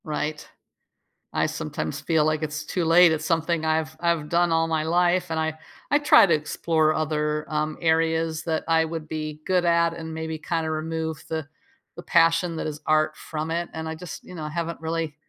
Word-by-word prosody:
Right? 155 0 -3 0.9
I - - +2
sometimes 80 0 -4
feel 160 -2 +2
like 155 0 0
it's 150 0 -4
too 180 +3 -2
late. 165 +1 +6
It's 155 0 -1
something 165 -1 0
I've 160 0 0
I've 170 -3 +1
done 170 +1 +2
all 165 0 +2
my 160 -1 0
life, 175 +2 +2
and 160 -1 -1
I 160 0 0 0.4
I 290 - +5
try 295 -6 +7
to 170 - +2
explore 155 +1 +1
other, 150 -1 -1
um, 155 0 -1
areas 160 -1 +1
that 160 -2 -1
I 165 0 +3
would 160 -1 -5
be 155 -1 -5
good 180 -1 +2
at, 170 -1 +3
and 160 -1 -7
maybe 160 0 -4
kinda 160 0 -2
remove 160 -1 -3
the 160 -2 -3 0.5
the - - -9
passion 165 0 +3
that - - -3
is 150 0 -6
art 155 0 +2
from 155 +1 -5
it, 170 +1 -2
and 160 0 -5
I 160 - -4
just, 170 -2 -9
you 180 - -11
know, 155 -2 -5
haven't 165 +2 -4
really 160 -2 -2
160 Hz, 195 wpm, -25 LUFS, 155-165 Hz, 0.9 s, try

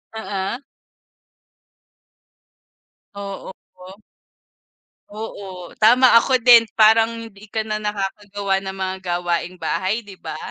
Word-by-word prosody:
Oo. 195 +1 -4 2.6
Oo 200 -1 -7 0.2
wo 185 +2 -13 1.1
Oo, 195 -4 -8
tama. 250 +4 +6
Ako 260 +1 +2
din 235 -2 +6
parang 225 +1 +6 0.2
hindi 200 +1 -16
ka 220 +1 -2
na 215 0 -3
nakakagawa 200 -1 -3
ng 190 0 -6
mga 190 0 -2 0.2
gawaing 175 +1 -2
bahay 200 +5 -2
'di 200 - -11
ba? 155 - -6
200 Hz, 105 wpm, -21 LUFS, 190-220 Hz, 2.6 s, tama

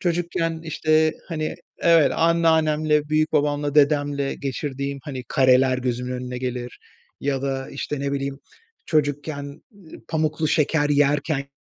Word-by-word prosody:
Çocukken, 170 -2 -1
işte, 155 0 +2 0.2
hani 155 -3 -3 0.2
evet, 165 -3 +4
anneannemle, 155 -2 +2
büyükbabamla, 150 -1 +1
dedemle 145 -1 +2
geçirdiğim, 140 0 -4
hani, 130 -2 -6
kareler 130 -1 +4
gözümün 125 0 -2
önüne 125 0 -5
gelir. 125 -1 -5 0.4
Ya 135 -1 -1
da, 135 -1 -3
işte, 140 +1 -4
ne 140 0 -2
bileyim, 140 0 -3 0.5
çocukken 145 -1 -2 0.5
pamuklu 155 -1 0
şeker 150 0 +2
yerkenki 145 0 +1
145 Hz, 115 wpm, -23 LUFS, 135-155 Hz, 0.5 s, evet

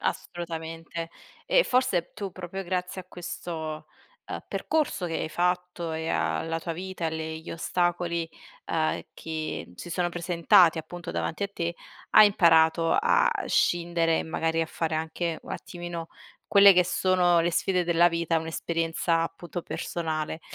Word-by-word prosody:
Assolutamente. 165 -1 -4 0.4
E - - +4
forse 250 -9 +1
tu 200 -3 -5
proprio 185 +1 -6
grazie 180 +1 -3
a - - -30
questo, 160 -3 -6 0.4
ehm, - - -5
percorso 300 - -1
che 165 - -4
hai 155 - -2
fatto 180 -1 -1
e 160 +1 -3
alla 165 0 -1
tua 165 - -4
vita, 185 0 -5
e - - +3
alle 160 0 -4
gli 160 - -9
ostacoli, 170 0 -1 0.4
uhm, 155 -1 0
che 155 - -5
si 175 - -9
sono 175 +1 0
presentati 170 -1 +4
appunto 175 +2 -7
davanti 165 - -3
a - - -3
te 170 -3 -3 0.4
hai 215 - +9
imparato 165 -4 +4
a 475 +2 +4 0.2
scindere, 170 -1 +2
magari 165 0 -1
a 165 - 0
fare 160 -1 -2
anche 160 +1 -2
un - - -11
attimino 175 -2 -6 0.4
quelle 200 -1 +8
che 180 0 +5
sono 180 -2 +3
le 170 - +1
sfide 180 +1 +1
della 170 0 +4
vita, 170 -1 0
un'esperienza 165 +1 -1
appunto 175 +1 -5
personale. 160 -1 -3
170 Hz, 145 wpm, -27 LUFS, 165-180 Hz, 0.4 s, hai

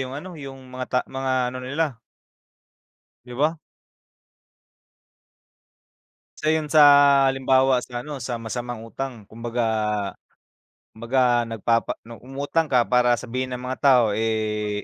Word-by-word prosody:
yung 130 +1 -4
ano, 180 +4 -8
yung 135 -1 -8 0.2
mga 130 0 -4
ta 125 - +1
mga 135 0 -3 0.2
ano 130 - -6
nila 140 -1 -2 1.3
'Di 125 - -10
ba? 155 +5 +1 2.8
Isa 155 - 0
yun 155 -1 +1
sa 155 +1 +4 0.5
halimbawa 130 -1 +3
sa 120 0 -6
ano, 150 -1 -7
sa 120 0 -4
masamang 120 0 -5
utang. 120 0 -6
Kumbaga 115 +1 -3 1.3
'kumbaga 120 +1 +1
nagpapa 115 +1 0
nung 115 0 -12
umutang 145 +5 -1
ka 125 -3 +3
para 125 -1 +3
sabihin 130 +2 -4
ng 125 - -8
mga 130 +1 -4
tao 130 -4 +5
eh, 105 -1 -1
125 Hz, 125 wpm, -23 LUFS, 115-135 Hz, 2.8 s, tao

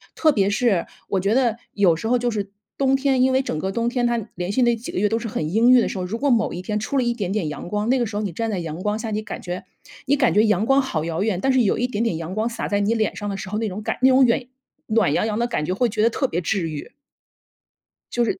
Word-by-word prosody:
特 315 - +4
别 200 -4 +2
是 205 -4 +1 0.2
我 195 - 0
觉 200 +3 +1
得 240 -3 +2 0.2
有 190 -5 +4
时 165 +7 -4
候 250 +2 +3
就 245 0 -1
是 205 -2 -3 0.3
冬 270 -1 +3
天 270 -1 +2
因 260 +1 +4
为 260 +1 +3
整 255 - -3
个 190 +4 -2
冬 230 +3 -1
天 245 -1 0
它 240 0 +1 0.2
连 180 +2 -3
续 255 - +1
那 240 -1 +3
几 230 +1 -7
个 - - -2
月 210 - +3
都 225 +2 0
是 230 - -5
很 155 -7 -3
阴 230 +3 +4
郁 255 0 +8
的 - - 0
时 - - -5
候， 180 - -2
如 205 +5 -3
果 285 +4 0
某 230 -4 +2
一 175 - -5
天 210 +2 -2
出 245 +6 -2
了 260 - +3
一 240 0 +1
点 200 -6 -3
点 200 -5 -1
阳 150 +3 -7
光， 210 +3 -1
那 260 0 +3
个 240 - +1
时 210 -1 -6
候 210 - -1
你 200 - -2
站 225 +6 -3
在 205 - -2
阳 165 0 -5
光 210 +2 -1
下， 225 0 -4
你 210 0 -1
感 215 - -7
觉 180 0 -5 0.4
你 280 +1 +3
感 265 -4 +2
觉 210 - +5
阳 210 -1 +2
光 270 +3 +4
好 165 - -2
遥 165 +1 -2
远， 205 -3 0
但 270 +3 +2
是 260 - +4
有 210 - +2
一 245 - +1
点 230 -3 -2
点 225 -9 0
阳 165 +2 -5
光 220 +3 0
洒 230 0 -4
在 205 - 0
你 205 +2 +1
脸 220 -2 0
上 205 -1 -4
的 195 - -3
时 190 - -7
候， 210 - -2
那 225 - -1
种 195 +3 -6
感 - - -2
那 260 - +6
种 260 0 +6
远 245 +1 +1 0.4
暖 215 -9 +2
洋 215 - +1
洋 215 -1 -2
的 235 - +1
感 235 -10 -2
觉 180 - -1
会 240 +6 +1
觉 210 - -1
得 225 - +5
特 265 +3 -1
别 175 - -2
治 175 -1 -1
愈。 150 -2 -7 1.2
就 240 -1 +1
是 210 - -2
220 Hz, 340 characters per minute, -22 LUFS, 195-240 Hz, 1.2 s, 郁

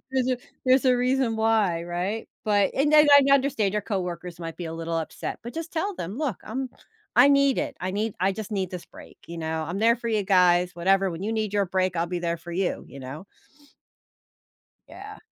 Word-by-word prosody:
‘Cause 255 -1 +2
if 250 -1 -1 0.2
there's 255 +1 +4
a 250 -1 +4
reason 250 -2 +1
why, 215 -7 +2
right, 180 +6 -3 0.2
but 205 -2 +2
and 290 +2 +2
then 300 0 +7
I 280 -1 +7
understand 265 -8 +2
your 210 - 0
coworkers 180 -4 -4
might 165 -1 -6
be 175 - -5
a 160 - -5
little 165 0 -4
upset, 160 - -5
but 240 - -7
just 330 0 -6
tell 385 +4 -2
them, 190 +8 -6
"Look, 285 - -2
I'm 255 +4 -4 0.5
I 255 +4 +7
need 280 -1 +4
it, - - -4
I 185 - -2
need 210 +2 -2
I 190 +2 +2
just 215 +1 -7
need 190 -3 -2
this 180 -2 -7
break, - - -15
you 170 0 -7
know? 160 0 -3
I'm 175 +5 -4
there 230 +1 +4
for 235 0 -4
you 215 -2 +1
guys, 180 -2 +4
whatever, 190 +2 +2
when 170 +3 -6
you 220 - -2
need 215 -2 -2
your 200 -1 +2
break, 185 0 0
I'll 170 +1 0
be 180 0 -3
there 170 -1 -1
for 170 +1 -10
you," 185 +1 -1
you 140 - -10
know? 140 +8 -8 1.6
Yeah. 415 +2 -10
200 Hz, 220 wpm, -25 LUFS, 175-250 Hz, 1.6 s, then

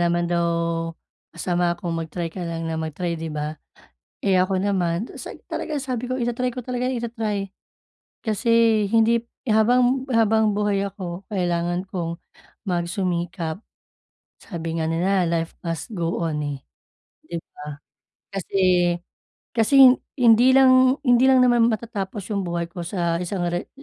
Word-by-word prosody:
naman 175 0 +1
daw 170 0 +1 0.8
masama 175 -1 -1
kung 175 -1 -4
mag-try 165 0 -4
ka 185 - -7
lang 165 -1 -4
ng 160 0 -2
mag-try, 160 +1 -3
di 165 - -4
ba? 150 0 -3 0.7
Eh, 190 -2 +3
ako 185 +1 +1
naman 190 0 0
se - - -9
talagang 300 -3 -3
sabi 250 -3 -3
ko 255 - -2
ita-try 240 +1 -1
ko 250 - -5
talaga 250 +1 -2
ita-try 225 -5 -2 0.7
kasi 225 -1 +3
hindi 230 +2 +3 0.2
habang, 245 +4 +3
habang 220 -1 +3
buhay 205 -1 0
ako, 190 -1 -7
kailangan 175 -2 0
kong 170 -2 -3 0.5
magsumikap. 175 -3 -2 0.9
Sabi 165 -4 -5
nga 160 - 0
nila, 185 +3 +2
"Life 165 -1 -1
must 165 +5 -4
go 170 -1 -1
on", 150 -2 -2
eh, 145 -2 -4 0.7
di 170 - -5 0.2
ba? 150 -1 -8 0.6
Kasi, 195 +1 -4 1.0
kasi 255 +3 +7 0.2
hindi 245 +1 +6
lang 260 0 +6
hindi 245 0 +5
lang 260 -1 +6
naman 240 -2 +4
matatapos 210 -3 -4
yung 200 - 0
buhay 170 0 -1
ko 180 - -7
sa 170 -1 -1
isang 180 0 -2
re 175 +1 -3
190 Hz, 140 wpm, -23 LUFS, 170-230 Hz, 1.0 s, kasi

